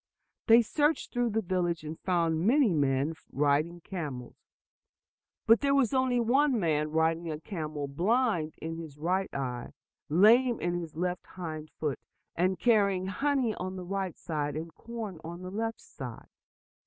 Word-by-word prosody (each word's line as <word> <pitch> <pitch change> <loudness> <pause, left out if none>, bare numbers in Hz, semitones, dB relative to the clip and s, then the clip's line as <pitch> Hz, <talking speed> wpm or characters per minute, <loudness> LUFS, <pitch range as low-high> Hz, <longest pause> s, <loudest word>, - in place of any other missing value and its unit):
They 230 0 +8
searched 295 +7 0
through 245 -1 +1
the 220 +1 0
village, 175 -3 -1
and 155 +1 -6
found 170 -3 +1
many 255 -5 +4
men 140 0 +1 0.2
riding 150 +5 +1
camels. 145 -10 -6 1.1
But 225 +1 +6
there 280 -1 +3
was 265 -4 +3
only 260 -2 +2
one 255 +2 +3
man 155 -4 +1
riding 160 +1 +1
a 155 -1 -4
camel 155 -6 -4
blind 180 - +1
in 165 0 -5
his 155 -4 -9
right 185 +5 0
eye, 125 -3 -4 0.4
lame 230 - +5
in 175 0 -1
left 180 +2 -2
hind 155 -4 -6
foot, 150 -4 -1 0.4
and 185 +2 +1
carrying 200 -4 +3
honey 260 +3 0
on 185 -1 -5
the 185 -1 -6
right 190 -1 -3
side, 150 -3 -3
and 160 +1 -5
corn 225 -7 -7
on 170 +2 -7
the 185 - -6
left 225 +2 -2
side. 125 -4 -9
180 Hz, 155 wpm, -29 LUFS, 155-225 Hz, 1.1 s, They